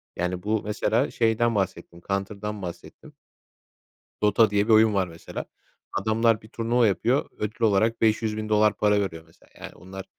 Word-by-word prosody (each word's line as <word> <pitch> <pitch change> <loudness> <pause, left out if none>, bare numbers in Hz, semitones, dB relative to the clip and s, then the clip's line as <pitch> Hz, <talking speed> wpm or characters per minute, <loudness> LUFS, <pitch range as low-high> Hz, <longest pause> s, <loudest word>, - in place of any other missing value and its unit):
Yani, 90 +1 -3
bu 110 0 0
mesela 110 +4 0
şeyden 115 0 +1
bahsettim; 95 -3 -3
Counter'dan 100 +1 -3
bahsettim. 85 -2 -9 1.1
Dota 105 +2 +4
diye 105 +1 +1
bir 115 - +4
oyun 110 -1 +5
var 95 -2 +1
mesela, 85 -1 -8 0.5
adamlar 115 0 +1
bir 110 - -16
turnuva 115 0 +1
yapıyor 120 +7 0
ödül 105 +2 -5
olarak 110 +2 +2
$500.000 110 -1 +1
para 105 -1 +2
veriyor 85 -5 -4
mesela. 80 - -25
Yani, - - -10
onlar 95 +2 -10
105 Hz, 145 wpm, -25 LUFS, 100-110 Hz, 1.1 s, oyun